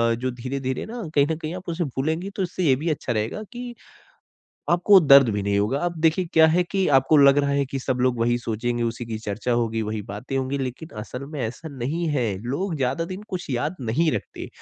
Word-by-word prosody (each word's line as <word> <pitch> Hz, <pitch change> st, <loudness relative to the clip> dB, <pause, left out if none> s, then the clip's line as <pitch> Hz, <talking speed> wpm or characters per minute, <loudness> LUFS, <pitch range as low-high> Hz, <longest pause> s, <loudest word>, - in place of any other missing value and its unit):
जो 130 Hz, +2 st, -2 dB
धीरे-धीरे 130 Hz, +1 st, -4 dB
ना 235 Hz, +1 st, -6 dB
कहीं 140 Hz, -1 st, +4 dB
न 160 Hz, -, 0 dB
कहीं 160 Hz, 0 st, -5 dB
आप 185 Hz, -1 st, -7 dB
उसे 170 Hz, +1 st, -1 dB
भूलेंगे 160 Hz, +8 st, -2 dB
तो 195 Hz, -, +1 dB
इससे 185 Hz, +1 st, -3 dB
ये 140 Hz, -6 st, +4 dB
भी 160 Hz, +5 st, -2 dB
अच्छा 140 Hz, -5 st, -2 dB
रहेगा 110 Hz, -, -2 dB
की 245 Hz, 0 st, -7 dB, 1.0 s
आपको 180 Hz, +3 st, +6 dB
दर्द 140 Hz, -5 st, +7 dB
भी 105 Hz, -1 st, -1 dB
नहीं 100 Hz, 0 st, +1 dB
होगा। 105 Hz, +7 st, +1 dB
अब 175 Hz, -, -3 dB
देखिए 165 Hz, +3 st, +3 dB
क्या 160 Hz, 0 st, +7 dB
है 175 Hz, +3 st, +3 dB
की 195 Hz, -1 st, +1 dB
आपको 135 Hz, +4 st, +3 dB
लग 140 Hz, 0 st, +6 dB
रहा 140 Hz, 0 st, +1 dB
है 140 Hz, 0 st, +1 dB
कि 135 Hz, +1 st, -4 dB
सब 130 Hz, -1 st, -1 dB
लोग 125 Hz, -1 st, +2 dB
वही 120 Hz, +1 st, +2 dB
सोचेंगे 120 Hz, +1 st, -2 dB
उसी 115 Hz, +1 st, -3 dB
की 110 Hz, -1 st, -4 dB
चर्चा 110 Hz, +3 st, -3 dB
होगी 115 Hz, -1 st, 0 dB
वही 110 Hz, 0 st, -3 dB
बातें 105 Hz, +7 st, -6 dB
होंगी 135 Hz, +1 st, -1 dB
लेकिन 135 Hz, +4 st, -5 dB
असल 125 Hz, +5 st, -7 dB
में 150 Hz, -, -4 dB
ऐसा 120 Hz, +7 st, -4 dB
नहीं 155 Hz, +8 st, -2 dB
है। 130 Hz, -5 st, +1 dB, 0.2 s
लोग 165 Hz, +9 st, -2 dB
ज़्यादा 135 Hz, +4 st, 0 dB
दिन 185 Hz, +3 st, -7 dB
कुछ 180 Hz, -5 st, -5 dB
याद 125 Hz, +8 st, -1 dB
नहीं 130 Hz, +8 st, +1 dB
रखते। -, -, -5 dB
135 Hz, 225 wpm, -24 LUFS, 120-165 Hz, 1.0 s, दर्द